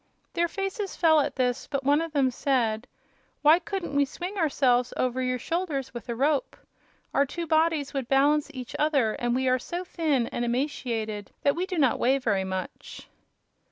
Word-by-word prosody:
Their 340 0 +1
faces 390 +2 -4
fell 320 -3 +5
at 290 - -1
this, 250 -2 0
but 275 -2 -2
one 290 +3 +3
of 330 -1 -4
them 275 -3 +2
said: 240 -3 0 0.6
"Why 310 +3 +7
couldn't 370 -6 -4
we 285 - +5
swing 350 +8 -5
ourselves 260 -8 +2
over 255 0 0
your 255 0 0
shoulders 310 -3 -3
with 240 0 -8
a 235 - -1
rope? 280 +3 0 0.6
Our 280 - +4
two 340 +5 -4
bodies 315 -2 +1
would 270 -4 -2
balance 290 +3 +3
each 255 -4 -8
other 280 -8 +2
and 240 0 -1
we 260 0 0
are 255 0 +3
so 345 +8 -5
thin 310 -9 0
and 240 - -3
emaciated 235 -5 -2
that 280 - +3
we 360 +2 -2
do 365 - -3
not 270 -6 +3
weigh 265 +3 +3
very 210 -7 0
much." 190 0 -6
275 Hz, 185 wpm, -27 LUFS, 245-320 Hz, 0.6 s, Why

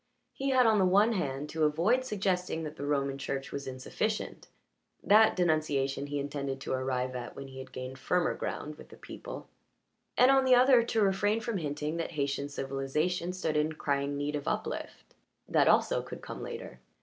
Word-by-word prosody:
He 275 +1 -2
had 260 -2 +5
on 220 -2 +4
the 190 - +4
one 205 +5 +4
hand 145 -7 -2
to 160 0 -1
avoid 175 +12 +3
suggesting 185 -7 -1
that 155 0 -6
the 145 - -5
Roman 140 -1 0
Church 135 -1 -4
was 140 -1 -5
insufficient 130 +12 -3 0.6
that 220 +2 +6
denunciation 145 -5 +1
he 145 0 -3
intended 140 -1 -3
to - - -5
arrive 130 -1 -1
at 120 -1 -6
when 140 - -7
he 130 0 -10
had 130 - -9
gained 130 +1 -7
firmer 180 +5 +1
ground 150 0 -5
with - - -13
the - - -13
people - - -9 0.7
and 250 +2 +7
on 270 0 +5
the 260 -1 +6
other 250 0 +6
to 225 -2 +1
refrain 205 +3 +2
from 225 -1 -2
hinting 150 +1 -3
that 170 0 -3
Haytian 140 -1 -1
civilization 145 +6 -2
stood 175 -4 -2
in 150 +1 +1
crying 140 -1 -1
need 145 +1 -2
of 145 - -4
uplift. - - -4 0.3
That - - +3
also - - +3
could - - -9
come - - -7
later. 65 - -7
150 Hz, 185 wpm, -30 LUFS, 140-200 Hz, 0.7 s, and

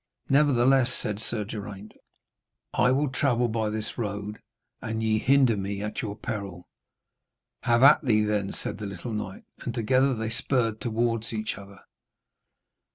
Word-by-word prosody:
'Nevertheless,' 135 -2 +4
said 105 -1 -2
Sir 110 -1 -1
Geraint, 105 -1 -8 0.8
'I - - +3
will 140 +2 +2
travel 125 -3 +1
by 110 -1 -1
this 110 +2 -4
road, 105 -1 -4 0.4
and 110 0 -3
ye 110 -1 +2
hinder 130 -3 +4
me 100 0 -3
at 105 - -3
your 105 -3 -4
peril.' 100 -6 -6 0.9
'Have 120 +1 +3
at 150 +2 +8
thee, 110 -5 +3
then,' 105 -2 0
said 105 - -5
the 105 - -4
little 100 +4 -6
knight, 95 -3 -5 0.2
and 120 - -5
together 130 +3 +2
they 110 0 -3
spurred 115 -2 0
towards 115 -1 -1
each 110 -1 -3
other. 100 -1 -13
110 Hz, 150 wpm, -27 LUFS, 105-125 Hz, 0.9 s, at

